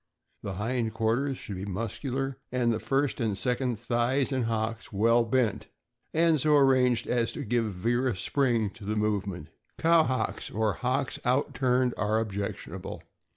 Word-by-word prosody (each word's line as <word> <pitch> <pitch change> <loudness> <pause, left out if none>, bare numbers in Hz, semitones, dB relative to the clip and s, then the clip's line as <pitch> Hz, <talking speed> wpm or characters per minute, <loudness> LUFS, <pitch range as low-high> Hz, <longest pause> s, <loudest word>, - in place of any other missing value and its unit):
The 100 - -4
hind 110 +3 -2
quarters 120 +5 0
should 100 - -7
be 95 - -5
muscular, 120 +6 -3
and 120 -2 +2
the 110 - -2
first 135 +1 0
and 105 -4 0
second 125 +1 0
thighs 120 +4 0
and 130 -3 0
hocks 115 0 -2
well 115 +4 +3
bent, 115 -2 0 0.4
and 165 -1 +3
so 150 +2 +4
arranged 130 -3 +4
as 120 -2 0
to - - -5
give 115 -2 0
vigorous 120 +3 0
spring 120 -6 +1
to 100 - -14
the 105 +2 -2
movement. 100 -6 -1 0.3
Cow 165 0 +5
hocks, 130 -5 -2
or 110 -1 0
hocks 130 +5 -1
out 130 +3 +1
turned, 125 -1 +2
are 105 +1 +2
objectionable. 100 -2 -5
120 Hz, 155 wpm, -28 LUFS, 110-130 Hz, 0.4 s, Cow